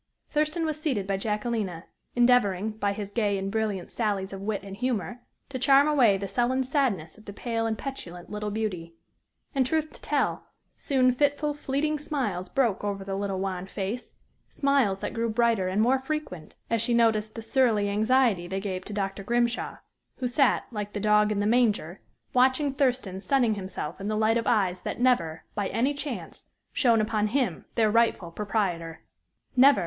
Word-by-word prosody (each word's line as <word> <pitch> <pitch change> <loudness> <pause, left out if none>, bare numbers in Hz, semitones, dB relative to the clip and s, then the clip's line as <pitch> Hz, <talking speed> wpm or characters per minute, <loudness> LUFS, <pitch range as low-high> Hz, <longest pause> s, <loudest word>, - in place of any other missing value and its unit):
Thurston 305 +2 0
was 310 -1 -2
seated 255 -11 0
by 195 0 0
Jacquelina, 210 -4 -2 0.3
endeavoring, 220 -5 +3
by 205 -2 -1
his 200 0 -5
gay 205 -2 +1
and 195 0 -3
brilliant 215 -4 -2
sallies 200 -4 -1
of 195 - -6
wit 205 -1 -2
and 195 -1 -8
humor, 245 0 -2 0.3
to 260 -2 -4
charm 275 +3 +5
away 250 -10 +4
the 195 0 -4
sullen 245 +6 +1
sadness 240 - -1
of 215 - -18
the - - -7
pale 230 +1 -2
and 220 -1 -1
petulant 180 -11 -7
little 210 0 -4
beauty. 190 -6 -3 0.6
And, 270 -2 +3
truth 310 +4 0
to - - -14
tell, - - -1 0.3
soon 255 -2 +2
fitful, 290 +3 +1
fleeting 295 +1 -1
smiles 210 -12 -2
broke 235 -8 +1
over 200 -1 -2
the 195 0 -5
little 195 0 -2
wan 190 -1 -3
face 200 +5 -5 0.3
smiles 275 -9 +1
that - - -3
grew 230 0 -1
brighter 225 -4 +2
and 190 +3 0
more 260 +3 +3
frequent 265 - -5
as 230 -2 0
she 235 +1 +1
noticed 220 -2 +2
the 225 - -6
surly 225 -4 +2
anxiety 215 -2 +2
they 190 +2 -2
gave 190 -2 -4
to 210 - -7
Dr. 195 -1 -2
Grimshaw, 235 +3 0 0.4
who 255 - -2
sat, 260 +2 +2
like 210 -2 -5
the 205 - -3
dog 210 0 +3
in 210 - 0
the 205 - +1
manger, 210 -6 +1 0.3
watching 260 +3 +3
Thurston 250 -9 0
sunning 245 -2 +2
himself 185 -4 -5
in 200 - -3
the 215 0 0
light 220 +1 +3
of 230 - -2
eyes 195 -6 +2
that - - -5
never, 170 -11 +2
by 200 -2 -1
any 240 +9 +1
chance, 285 -3 -6 0.3
shone 230 -4 +4
upon 215 0 0
him, 255 +3 -1
their 220 -2 +3
rightful 225 -6 +2
proprietor! 175 -5 -2 0.5
Never! 270 +2 +7
220 Hz, 180 wpm, -27 LUFS, 195-255 Hz, 0.6 s, Never